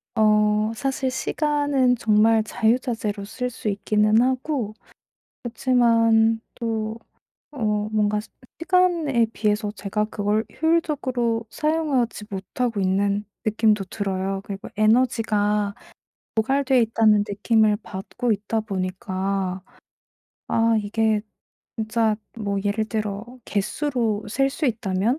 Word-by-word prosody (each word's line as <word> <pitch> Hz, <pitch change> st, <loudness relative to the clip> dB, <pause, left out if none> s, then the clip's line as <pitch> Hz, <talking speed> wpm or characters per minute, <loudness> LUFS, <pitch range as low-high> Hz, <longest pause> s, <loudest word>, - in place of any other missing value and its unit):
어 210 Hz, 0 st, +3 dB
사실 265 Hz, 0 st, -1 dB
시간은 285 Hz, -2 st, +1 dB
정말 220 Hz, 0 st, +4 dB
자유자재로 220 Hz, -2 st, -1 dB
쓸 250 Hz, +4 st, -4 dB
수 220 Hz, -3 st, -4 dB
있기는 210 Hz, +2 st, +2 dB
하고 255 Hz, -3 st, -1 dB, 0.7 s
그렇지만 230 Hz, -2 st, +3 dB
또 225 Hz, -1 st, -3 dB, 0.5 s
어 210 Hz, -5 st, -1 dB
뭔가 210 Hz, -1 st, +1 dB, 0.4 s
시간에 335 Hz, -9 st, +2 dB
비해서 210 Hz, -1 st, 0 dB
제가 210 Hz, +1 st, -2 dB
그걸 215 Hz, +1 st, -1 dB, 0.2 s
효율적으로 255 Hz, -9 st, 0 dB
사용하지 295 Hz, -9 st, 0 dB
못하고 205 Hz, +3 st, -3 dB
있는 200 Hz, +2 st, +1 dB, 0.2 s
느낌도 215 Hz, -2 st, +2 dB
들어요. 195 Hz, 0 st, -3 dB
그리고 200 Hz, -1 st, -7 dB
에너지가 215 Hz, -3 st, +2 dB, 0.6 s
고갈되어 265 Hz, +4 st, +2 dB
있다는 220 Hz, -2 st, +4 dB
느낌을 210 Hz, +1 st, +2 dB
받고 225 Hz, +6 st, -3 dB
있다 210 Hz, +2 st, -1 dB
보니까 190 Hz, -1 st, -3 dB, 0.9 s
아 230 Hz, 0 st, +3 dB
이게 215 Hz, 0 st, +1 dB, 0.6 s
진짜 220 Hz, 0 st, +1 dB, 0.2 s
뭐 200 Hz, -2 st, -1 dB
예를 210 Hz, +2 st, 0 dB
들어 215 Hz, -1 st, -3 dB, 0.2 s
갯수로 220 Hz, 0 st, -1 dB
셀 270 Hz, +5 st, +1 dB
수 295 Hz, +1 st, -2 dB
있다면 220 Hz, +3 st, 0 dB
220 Hz, 240 characters per minute, -23 LUFS, 205-245 Hz, 0.9 s, 정말